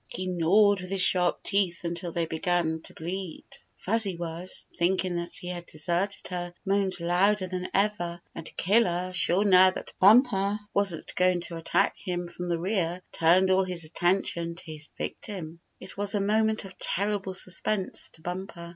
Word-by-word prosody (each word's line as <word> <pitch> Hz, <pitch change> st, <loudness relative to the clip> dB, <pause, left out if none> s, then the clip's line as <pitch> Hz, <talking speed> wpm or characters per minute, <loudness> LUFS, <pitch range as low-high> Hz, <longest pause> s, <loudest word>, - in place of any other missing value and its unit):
He 185 Hz, -, -6 dB
gnawed 185 Hz, +3 st, +3 dB
with 185 Hz, -, -8 dB
his 195 Hz, -1 st, -1 dB
sharp 180 Hz, -3 st, +3 dB
teeth 195 Hz, -4 st, 0 dB
until 170 Hz, 0 st, -2 dB
they 170 Hz, 0 st, -1 dB
began 160 Hz, 0 st, -1 dB
to -, -, -7 dB
bleed. 180 Hz, +1 st, -6 dB, 0.3 s
Fuzzy 200 Hz, -3 st, +2 dB
Wuzz, 170 Hz, +2 st, -2 dB
thinking 180 Hz, 0 st, 0 dB
that 170 Hz, 0 st, -5 dB
he 180 Hz, -, -5 dB
had 175 Hz, -1 st, -6 dB
deserted 175 Hz, +6 st, -2 dB
her, 175 Hz, -1 st, -5 dB
moaned 195 Hz, -1 st, 0 dB
louder 185 Hz, +4 st, +2 dB
than 185 Hz, 0 st, -5 dB
ever, 190 Hz, -4 st, -1 dB
and 165 Hz, -, -6 dB
Killer, 185 Hz, -3 st, +1 dB
sure 180 Hz, +2 st, +5 dB
now 185 Hz, -1 st, +7 dB
that 185 Hz, -, -7 dB
Bumper 205 Hz, -1 st, +4 dB, 0.2 s
wasn't 195 Hz, -5 st, +1 dB
going 180 Hz, -1 st, +2 dB
to 170 Hz, 0 st, -3 dB
attack 165 Hz, -, +1 dB
him 175 Hz, -2 st, -4 dB
from 175 Hz, +1 st, -7 dB
the 170 Hz, -, 0 dB
rear, 180 Hz, -1 st, -2 dB
turned 180 Hz, +3 st, +3 dB
all 190 Hz, +1 st, +3 dB
his 180 Hz, -2 st, -2 dB
attention 170 Hz, 0 st, 0 dB
to 175 Hz, -, -4 dB
his 150 Hz, -1 st, -7 dB
vic -, -, -5 dB
tim. 170 Hz, -6 st, -5 dB, 0.2 s
It 185 Hz, -, -10 dB
was 205 Hz, +1 st, +1 dB
a -, -, +1 dB
moment 215 Hz, +1 st, +1 dB
of 190 Hz, -1 st, -13 dB
terrible 200 Hz, -1 st, 0 dB
suspense 185 Hz, +2 st, 0 dB
to 160 Hz, -, -10 dB
Bumper. 175 Hz, -1 st, -6 dB
180 Hz, 175 wpm, -27 LUFS, 170-195 Hz, 0.3 s, now